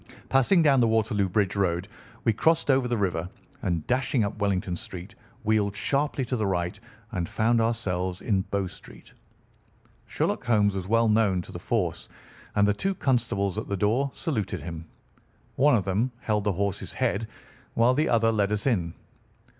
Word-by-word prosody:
Passing 135 +7 +4
down 140 -4 +5
the 115 - +4
Waterloo 110 -3 +1
Bridge 100 +1 +1
Road 90 -2 0 0.4
we 115 - +3
crossed 160 +6 +2
over 130 -1 +2
the 120 -1 0
river, 90 -4 -1 0.3
and 85 -4 -1
dashing 125 -1 +1
up 100 - -2
Wellington 95 -3 0
Street 90 +4 -8 0.3
wheeled 105 -2 +1
sharply 140 +4 0
to 125 - -2
the 110 -4 0
right 90 -2 -1 0.3
and 90 -6 -2
found 115 +1 +2
ourselves 95 -6 -1
in 100 -4 +1
Bow 100 -1 0
Street. 90 - -12 0.9
Sherlock - - -1
Holmes 105 -4 +3
was 95 -1 -4
well 115 +2 +3
known 105 -4 +3
to - - -12
the - - -7
force, - - -2 0.5
and 100 0 +4
the 105 - +3
two 195 - -2
constables 110 - 0
at - - -6
the 100 - -2
door 115 +8 +1
saluted 105 - -2
him. 85 -1 -6 0.7
One 140 +1 +5
of 105 - 0
them 105 +7 0
held 105 -2 0
the 105 - +2
horse's 100 +1 -2
head 115 - -1 0.5
while 120 +2 +4
the 150 +4 +1
other 115 -1 +3
led 105 -2 +1
us 105 -1 -1
in. 90 -11 0
105 Hz, 175 wpm, -26 LUFS, 95-120 Hz, 0.9 s, down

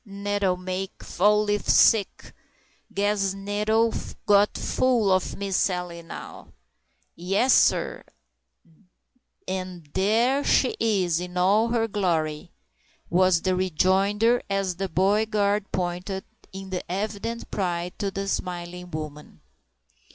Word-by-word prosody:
"Ugh! 205 - -17
Nettle 200 -2 -1
make 185 +1 -5
Fall 210 +3 +2
leaf 205 0 -1
sick! 210 -4 +3 0.6
Guess 200 -1 0
Nettle 210 +3 0 0.3
got 205 0 +4
full 240 -6 +1
of 185 -1 0
Miss 200 -1 -3
Sally 180 -3 -1
now!" 165 - -10 0.6
"Yes, 195 +9 +2
sar; - - +2 1.4
and 185 -3 -5
thar 230 +8 +2
she 260 - +2
is, 190 -7 +1
in 180 0 -6
all 200 +5 +3
her 230 -1 0
glory!" 170 -6 -1 0.6
was 180 -1 +3
the 185 -1 +1
rejoinder, 195 +6 +2
as 195 -3 -1
the 195 0 -3
"body 200 +5 +2
guard" 205 -1 0
pointed, 180 +2 -3 0.3
in 190 0 -8 0.2
evident 210 +4 -4
pride, 175 -2 -2
to 200 -2 -1
the 195 +1 -4
smiling 180 -1 -4
woman. 150 - -8
195 Hz, 115 wpm, -25 LUFS, 180-210 Hz, 1.4 s, got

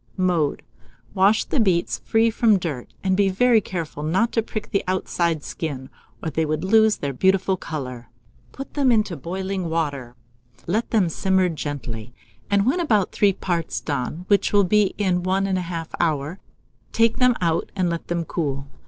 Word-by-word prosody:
Mode. 175 -6 +1 0.5
Wash 195 +3 +3
the 285 - -1
beets 185 -6 +1
free 225 +1 +2
from 220 -2 +4
dirt, 150 -9 -5
and 190 -1 +2
be 200 0 +3
very 225 +4 +4
careful 165 -6 -5
not 185 +10 +1
to 225 - +1
prick 215 -1 -6
the 200 - +1
outside 170 -4 0
skin, 135 -5 -5 0.3
or 160 - -2
they 160 - 0
would 155 +1 -2
lose 220 +2 +4
their 140 -1 -3
beautiful 190 +6 +2
colour. 130 -9 -6 0.4
Put 275 - -9
them 275 -4 +3
into 215 -6 +1
boiling 185 +3 -4
water, 145 -7 -2 0.5
let 215 +7 -1
them 210 -6 +3
simmer 190 +2 +1
gently, 125 -7 -6 0.3
and 200 0 +3
when 270 +9 +2
about 215 - +2
three 200 -2 +3
parts 175 -3 -2
done, 145 +4 -4
which 200 -1 +3
will 205 -1 +5
be 205 +1 +2
in 185 -3 +1
1 190 +2 0
1/2 180 -4 -3
hour, 155 +2 -1 0.5
take 230 0 +2
them 250 -1 +4
out 165 -2 0
and 185 -2 +1
let 170 -1 -3
them 170 -1 -2
cool. 140 -6 -3
185 Hz, 170 wpm, -23 LUFS, 160-205 Hz, 0.5 s, will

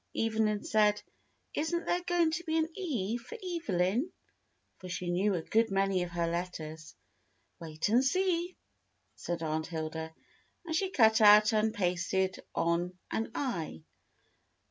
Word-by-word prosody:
Evelyn 220 -2 +1
said, 210 -1 +2 0.5
"Isn't 335 +2 -1
there 355 - 0
going 350 -2 +2
to 345 +2 -3
be 320 -1 0
an 320 0 +2
E 240 - -2
for 255 - -10
Evelyn?" 245 - 0 0.7
for 185 - -9
she 180 0 -3
knew 190 +3 +1
a 165 - -3
good 225 +5 +2
many 195 -1 +1
of 175 - -3
her 175 -1 -1
letters. 165 -2 -5 0.6
"Wait 160 -1 -3
and 235 +5 +4
see," 360 +3 0 0.6
said 170 -1 -4
Aunt 155 0 -2
Hilda, 160 -1 -4 0.5
and 320 -1 -2
she 380 +3 +1
cut 220 -9 +4
out 210 +1 +7
and 215 0 +2
pasted 185 -1 0 0.2
on 175 +2 0
an 225 - -1
I. 170 - -3
210 Hz, 145 wpm, -31 LUFS, 175-285 Hz, 0.7 s, out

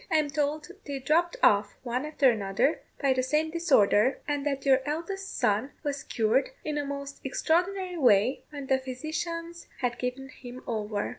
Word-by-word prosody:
I 330 - +1
am 295 -2 +1
told 295 +2 -1 0.2
they 280 -1 -3
dropped 320 +6 +1
off, 205 0 +4
one 250 +4 -2
after 285 -4 +4
another, 205 +6 0 0.2
by 275 -2 +3
the 255 - +1
same 300 +5 0
disorder, 265 - +4
and 290 -1 -1
that 275 -1 -2
your 265 -1 +5
eldest 340 +7 -4
son 215 +7 +1
was 285 -2 -2
cured 230 +4 +1 0.2
in 300 -1 -1
a - - -1
most 280 0 -6
extraordinary 360 +6 0
way, 245 -2 +4
when 285 -2 -7
the 265 0 +2
physicians 335 +6 -5
had 245 -2 -1
given 255 +2 -3
him 250 0 -10
over." 210 -3 -2
280 Hz, 170 wpm, -28 LUFS, 250-310 Hz, 0.2 s, your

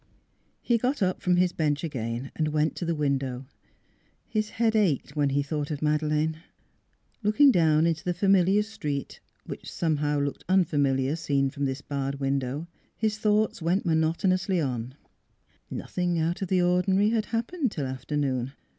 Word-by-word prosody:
He 235 -1 +2
got 255 -1 0
up 185 0 0
from 180 -2 +2
his 180 0 +2
bench 150 -1 0
again 125 -4 -4
and 155 - 0
went 155 +1 0
to 175 - -3
the 170 0 0
window; 135 -3 -1 0.8
his 215 -1 -1
head 225 -1 +2
ached 185 - +1
when 145 -2 +2
he 140 +1 +1
thought 145 0 -3
of 150 -1 -4
Madeleine.... 155 +1 +1 0.8
Looking 225 +7 +5
down 160 -5 +3
into 165 -1 0
the 175 -1 -1
familiar 195 +1 +4
street, 150 - -5 0.3
which - - -8
somehow 150 -3 0
looked 140 0 -3
unfamiliar 145 -6 +2
seen 140 -4 0
from 140 +1 -2
this 135 +1 -3
barred 140 -1 -3
window, 135 +2 -1 0.3
his 215 -1 -1
thoughts 215 -2 +1
went 175 +5 +1
monotonously 175 +3 +1
on: 125 -3 -3 0.7
nothing 175 -1 -2
out 165 +3 -1
of 190 - -1
the 185 0 +2
ordinary 190 +3 +3
had 220 -2 +1
happened 245 - -1
till 145 -8 -3
afternoon. 130 0 -2
160 Hz, 155 wpm, -27 LUFS, 140-190 Hz, 0.8 s, Looking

